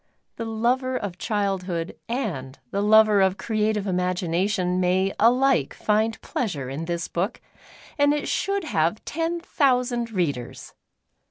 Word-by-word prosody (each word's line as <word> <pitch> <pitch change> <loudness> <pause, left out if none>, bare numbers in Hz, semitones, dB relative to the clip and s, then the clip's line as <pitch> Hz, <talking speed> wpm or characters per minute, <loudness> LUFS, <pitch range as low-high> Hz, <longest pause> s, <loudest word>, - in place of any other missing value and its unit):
The 230 - -4
lover 250 +4 0
of 190 -5 -5
childhood 190 -5 -2
and 170 - -3
the 200 - 0
lover 215 -1 +6
of 190 0 +2
creative 215 0 0
imagination 180 0 0
may 185 +2 +2
alike 255 +4 +3
find 220 +1 +1
pleasure 155 - -3
in 150 +4 -4
this 170 0 -3
book, 190 +7 -2 0.6
and 285 0 +5
it 295 0 -1
should 395 -1 0
have 170 - 0
ten 330 +2 -2
thousand 250 -7 +1
readers. 155 - -3
210 Hz, 125 wpm, -24 LUFS, 180-240 Hz, 0.6 s, lover